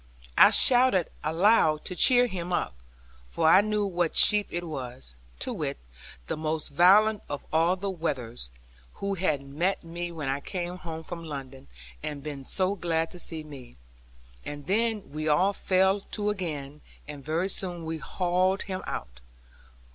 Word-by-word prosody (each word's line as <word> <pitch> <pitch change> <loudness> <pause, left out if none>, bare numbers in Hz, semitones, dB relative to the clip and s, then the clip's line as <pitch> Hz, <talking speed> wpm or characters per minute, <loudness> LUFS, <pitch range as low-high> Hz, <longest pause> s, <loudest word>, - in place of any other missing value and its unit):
I - - +8
shouted 245 -8 +4
aloud 160 -1 +3
to 180 - -4
cheer 245 +5 +6
him 180 -6 -5
up, 125 - -1 0.5
for 160 - 0
I 185 +4 +7
knew 210 0 0
what 175 -4 -1
sheep 210 -1 +5
it 175 +1 -3
was, 125 - -7 0.2
to - - -3
wit, - - -3 0.5
the - - -3
most 155 0 -2
valiant 200 +7 +5
of 145 - -5
all 165 +3 +3
the 195 +1 -3
wethers, 125 - -3 0.5
who 200 0 -3
had 160 -7 -1
met 160 +8 -1
me 170 +1 -5
when 155 -4 -5
I 135 +1 -1
came 180 +3 -5
home 160 -2 -7
from 170 +1 -7
London, 135 -3 -8 0.3
and 145 -2 -5
been 145 -3 -6
so 185 +5 +1
glad 165 -4 -1
to 180 - -8
see 160 -2 -3
me. 135 -5 -12 0.7
And 145 -1 -7
then 220 -1 0
we 155 +1 -4
all 180 +7 +3
fell 190 +1 +2
to 210 +1 -3
again; 150 -7 -5 0.3
and 145 -2 -9
very 160 +5 -1
soon 180 -3 -1
we 160 0 -4
hauled 185 +3 0
him 190 -2 -5
out. - - -6
170 Hz, 160 wpm, -27 LUFS, 150-190 Hz, 0.7 s, I